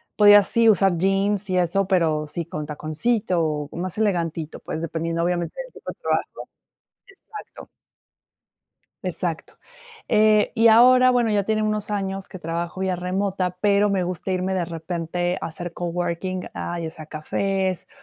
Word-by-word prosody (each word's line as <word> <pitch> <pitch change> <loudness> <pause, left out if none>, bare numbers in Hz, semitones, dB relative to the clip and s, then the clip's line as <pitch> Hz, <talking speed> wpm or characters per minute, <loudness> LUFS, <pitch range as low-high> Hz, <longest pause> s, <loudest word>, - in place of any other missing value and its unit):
Podía, 205 -1 +8
sí, 230 +2 +2
usar 195 -4 +3
jeans 195 +2 +1
y 185 - +1
eso, 185 +2 +1
pero, 160 -5 +1
sí 165 +3 -4
con 155 -2 -5
taconcito 165 +6 -1
o 150 -1 -3
más 180 +2 -4
elegantito, 165 -6 -1
pues, 160 - -5
dependiendo, 165 +1 -2
obviamente, 175 - -2
del - - -11
tipo - - -8
de - - -17
trabajo. - - -2 0.7
Exacto. 400 +2 -12 1.4
Exacto. - - -3 0.5
Eh, 215 0 +4
y 230 0 +5
ahora, 255 +3 +7
bueno, 240 -2 +2
ya 205 -1 +2
tiene 215 +1 0
unos 215 -1 -2
años 195 -1 -3
que 190 - -9
trabajo 170 +2 -4
vía 190 -1 0
remota, 185 0 -2
pero, 205 0 +3
me 190 -2 +1
gusta 180 +1 -4
irme 185 +1 -1
de 180 - 0
repente 170 +2 -3
a - - -3
hacer 175 +1 -6
coworking, 175 +1 -3
a 175 0 -4
ya 165 - -3
sea 160 -1 -10
cafés, 190 +4 -2
185 Hz, 155 wpm, -23 LUFS, 170-205 Hz, 1.4 s, Podía